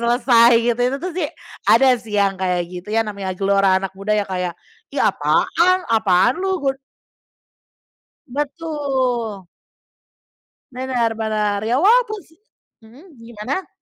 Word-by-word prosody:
selesai 235 0 +4 0.2
gitu, 240 - -6
itu 250 +3 +1
tuh 360 +4 -5
sih, 340 -4 -2 0.4
ada 265 -1 +6
sih 215 -2 -5
yang 200 -1 +2
kayak 180 -2 0
gitu. 180 +2 -9
Ya 225 +1 +1
namanya 195 -3 -5
gelora 195 -1 +2
anak 190 0 -3
muda 195 +2 -2
yang 205 - 0
kayak, 180 -2 -4 0.3
ih - - -1
apaan? 365 +1 +2
Apaan 220 - +3
lu? 380 0 0
Gu 270 -1 +1 1.5
Betul. 265 - -3 1.3
Bener 245 -3 -1
bener. 210 -2 -1
Ya 235 +3 +1
wajar 450 +4 +4
sih 320 +1 -26 0.5
mhm, 280 +8 -17
gimana? 235 - -5
230 Hz, 130 wpm, -20 LUFS, 200-280 Hz, 1.5 s, ada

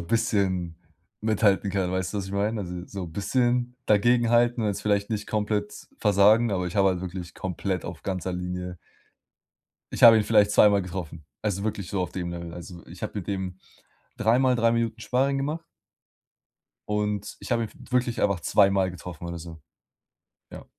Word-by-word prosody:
'n 85 - -8
bisschen 95 -6 0 0.4
mithalten 105 -2 +2
kann, 95 -2 -1
weißt 95 0 -2
du, 105 - 0
was 95 - -4
ich 95 - -8
meine? 105 +2 0
Also, 90 -2 -6
so 100 -2 -6
'n 80 - -10
bisschen 125 +5 0
dagegenhalten, 120 +2 +3
jetzt 100 -2 -2
vielleicht 100 -1 +1
nicht 105 -1 -2
komplett 105 -1 -2
versagen, 105 +3 +4
aber 90 -2 -1
ich 90 - -6
habe 100 -2 +4
halt 90 -2 -1
wirklich 90 -1 -6
komplett 95 0 -3
auf 85 -1 -7
ganzer 95 -1 -3
Linie 90 0 -4 1.2
ich - - -5
habe 115 -1 +10
ihn 110 - +2
vielleicht 105 -2 +4
zweimal 105 -1 +5
getroffen, 85 -3 -6 0.2
also 100 -2 -1
wirklich 105 -4 -3
so 100 - -1
auf 90 - -3
dem 90 -2 -4
Level. 85 -1 -7
Also, 85 0 -10
ich 85 0 -13
habe - - -3
mit 90 - -7
dem 95 -2 -3 0.6
3 115 +3 +3
Mal 130 -1 +3
3 115 0 +3
Minuten 115 -1 -1
Sparring 135 +4 +1
gemacht 150 +4 -2 1.3
und 105 -1 -2
ich - - -4
habe 115 -1 +1
ihn 110 - -8
w - - -16
wirklich 125 -2 +1
einfach 100 -3 +1
2 100 +3 +4
Mal 95 -1 +1
getroffen 90 -1 -8
oder 85 0 -5
so. 80 -1 -10 0.9
Ja. - - -10
100 Hz, 185 wpm, -26 LUFS, 90-110 Hz, 1.3 s, habe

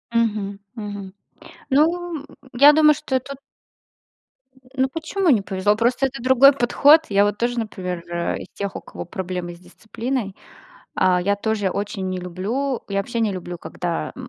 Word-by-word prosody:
Мгм, 210 -3 0 0.2
мгм. 205 -4 -7 0.6
Ну, 325 +2 +1 0.3
я 280 +4 +8
думаю, 305 0 +6
что 280 -3 -1
тут. 275 +1 -9 1.4
Ну 265 0 +1
почему 330 +5 -1
не 230 -7 +4
повезло? 195 +1 0
Просто 240 +4 +1
это 265 -2 -8
другой 260 +2 +6
подход. 285 +4 +5
Я, 200 0 +4
вот, 205 0 -1
тоже, 240 0 -1
например, 180 -5 -4 0.3
из - - -7
тех, 200 -1 -5
у - - -5
кого - - -9
проблемы 180 -2 -5
с - - -18
дисциплиной, 220 +4 -5 0.6
а, 180 -1 +3
я 200 +3 +1
тоже 205 -1 -1
очень 200 -1 -3
не 185 0 -3
люблю. 215 +10 -3
Я 195 - -2
вообще 230 +4 -2
не 220 -3 +1
люблю, 180 -1 -6
м, - - -6
когда 170 -1 -4
220 Hz, 160 wpm, -22 LUFS, 195-265 Hz, 1.4 s, я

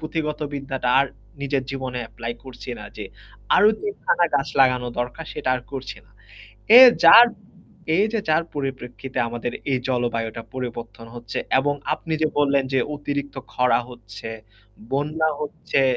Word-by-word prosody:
পুঁথিগত 155 -1 -3
বিদ্যাটা 135 -2 -3
আর 140 - +2 0.3
নিজের 140 -1 -1
জীবনে 130 -2 -4
এপ্লাই 115 +1 -6
করছি 125 -1 -9
না - - -9
যে - - -6 0.5
আরও 210 - +6
৩ 410 -1 -3
খানা 175 - +3
গাছ 140 -1 +1
লাগানো 125 -2 +3
দরকার 125 +6 -4
সেটা - - -4
আর 125 - -3
করছি 135 -1 -6
না। - - -27 0.7
এ - - +12 0.2
যার 230 +9 +10 0.7
এই 200 - +4
যে 225 - 0
যার 155 +2 +3
পরিপ্রেক্ষিতে 130 -2 -5
আমাদের 120 +1 -4 0.2
এই 130 - +2
জলবায়ুটা 115 -3 -2
পরিবর্তন 120 -2 -6
হচ্ছে 120 -2 -6 0.2
এবং 145 +2 +1 0.2
আপনি 165 - -7
যে - - +4
বললেন 140 -1 +3
যে 135 - +3 0.2
অতিরিক্ত 145 -1 -4 0.2
খরা 125 0 +3
হচ্ছে, 110 -2 -10 0.6
বন্যা 155 +3 0
হচ্ছে, 145 -2 -1
135 Hz, 150 wpm, -23 LUFS, 120-145 Hz, 0.7 s, এ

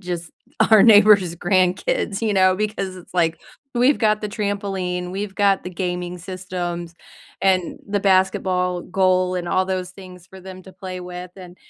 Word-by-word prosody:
just 175 -3 -6 0.4
our 215 -2 +8
neighbors' 205 -5 +6
grandkids, 185 +3 0
you 220 -2 0
know, 185 -1 +4
because 195 -3 -3
it's 180 0 -15
like, 165 -2 +1 0.4
we've 250 +4 +3
got 215 -2 +2
the 210 - -4
trampoline, 195 -4 -3
we've 195 0 -5
got 200 -2 +2
the 180 - -7
gaming 180 0 -4
systems 175 -2 -5 0.5
and 185 -2 +1
the 205 0 -1
basketball 185 -2 +1
goal 185 -1 +1
and 175 -1 -4
all 185 +1 +1
those 185 -1 -3
things 180 -2 -13
for 190 +1 -14
them 185 0 -10
to 190 - -14
play 185 -2 -7
with 180 0 -8
and 180 -1 -12
185 Hz, 165 wpm, -21 LUFS, 180-195 Hz, 0.5 s, our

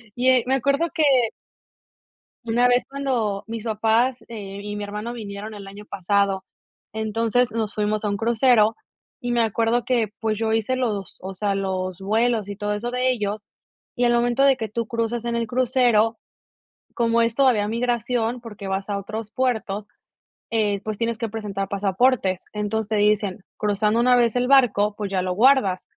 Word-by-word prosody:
Y, 250 +1 0
eh, 255 -2 +4
me 265 - +3
acuerdo 280 +5 +1
que 320 -3 +1 1.4
una 240 +2 +3
vez, 245 0 +3
cuando 245 -8 -1
mis 225 -1 -6
papás, 225 +3 +1
eh, 200 -3 -7
y 205 0 -5
mi 205 - -4
hermano, 210 +4 -5
vinieron 210 -1 -7
el 200 -1 -9
año 200 +2 -10
pasado, 195 0 0 0.5
entonces, 225 +2 0
nos 220 -1 -2
fuimos 210 0 -1
a - - +1
un 200 - -2
crucero, 230 -1 +3 0.4
y 245 -2 -3
me 240 - +2
acuerdo 230 +2 +1
que, 240 -4 +1
pues, 220 -1 0
yo 220 -1 0
hice 225 +3 0
los 215 -7 -3
o 190 +1 -5
sea, 200 +1 -1
los 185 -1 -3
vuelos, 220 +1 +1
y 200 - -6
todo 210 0 -2
eso, 230 +4 -3
de 250 +1 +1
ellos. 210 -3 -3 0.5
Y 245 - +1
al 240 - +4
momento, 240 +2 +2
de 275 -2 +4
que 220 - -3
tú 230 +2 -3
cruzas 230 +1 -2
en 235 0 -1
el 230 0 -1
crucero, 240 -2 +2 0.8
como 230 -1 +2
es 230 -1 +1
todavía 245 -6 +3
migración, 235 +1 -1
porque 210 -4 -9
vas 195 +1 -3
a 200 - -1
otros 215 +2 -6
puertos, 220 -4 -2 0.6
eh, 210 -3 +1
pues, 215 -1 -4
tienes 230 0 -1
que 230 -1 -3
presentar 200 -3 -4
pasaportes. 200 0 +1
Entonces, 210 +1 -2
te 215 - +1
dicen: 210 -1 +1 0.2
"Cruzando 210 +2 +1
una 250 0 +5
vez 235 -2 +2
el 250 0 +1
barco, 220 -6 +4
pues, 205 -2 -3
ya 190 -1 0
lo 180 0 -1
guardas". 220 -4 +3
220 Hz, 180 wpm, -23 LUFS, 205-240 Hz, 1.4 s, una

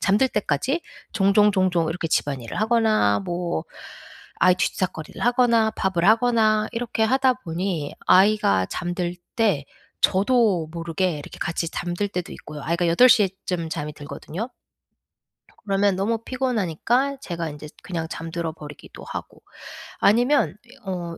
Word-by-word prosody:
잠들 210 +8 +3
때까지 210 - -1 0.3
종종 205 0 +4
종종 180 -4 +1
이렇게 165 0 -3
집안일을 135 - -1
하거나 215 - +3
뭐 175 - -3 0.7
아이 185 - +5
뒤치다꺼리를 180 -3 -3
하거나 240 -2 +3
밥을 190 -5 -1
하거나 220 -2 +3
이렇게 235 -1 -2
하다 260 +2 +3
보니 170 - -3
아이가 190 - +4
잠들 175 - -3 0.2
때 205 - +2 0.4
저도 200 -4 +3
모르게 170 +2 -1
이렇게 145 - -10
같이 165 0 -2
잠들 175 +4 -2
때도 180 -3 -4
있고요. 150 -1 -9
아이가 170 +2 0
8 170 +10 +6
시에 220 -5 +5 0.2
쯤 170 -3 -2
잠이 150 -2 -4
들거든요. 150 - -6 1.2
그러면 195 -1 +2
너무 210 +4 0
피곤하니까 250 - 0
제가 170 - -4
인제 150 0 -9
그냥 165 -3 -4
잠들어 165 0 -4
버리기도 150 -2 -12
하고. - - -8 0.6
아니면 240 - +3
이 250 +3 -17
어 175 -3 -4
185 Hz, 305 characters per minute, -23 LUFS, 165-220 Hz, 1.2 s, 8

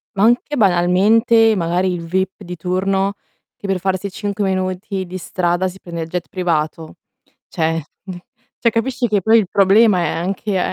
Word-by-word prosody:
Ma 195 - +1
anche, 240 +6 +2
banalmente, 215 +4 +4
magari 180 +1 0
il 175 - -4
VIP 190 +4 -2
di 180 -1 -7
turno, 190 +3 -1 0.4
che 200 - -8
per 195 -1 0
farsi 190 +1 -2
5 205 +1 -3
minuti 185 +1 -2
di 185 +1 -7
strada 175 0 -1
si 185 +1 -9
prende 170 -2 -6
il 160 - -4
jet 175 +1 -4
privato. 160 -3 -2 0.5
Cioè 165 -1 -1 0.8
cioè 230 - +2
capisci 245 +2 -1
che 205 -3 +1
poi 220 +5 +5
il 215 -4 +2
problema 200 0 +4
è - - 0
anche 190 +3 -2
190 Hz, 160 wpm, -18 LUFS, 175-205 Hz, 0.8 s, poi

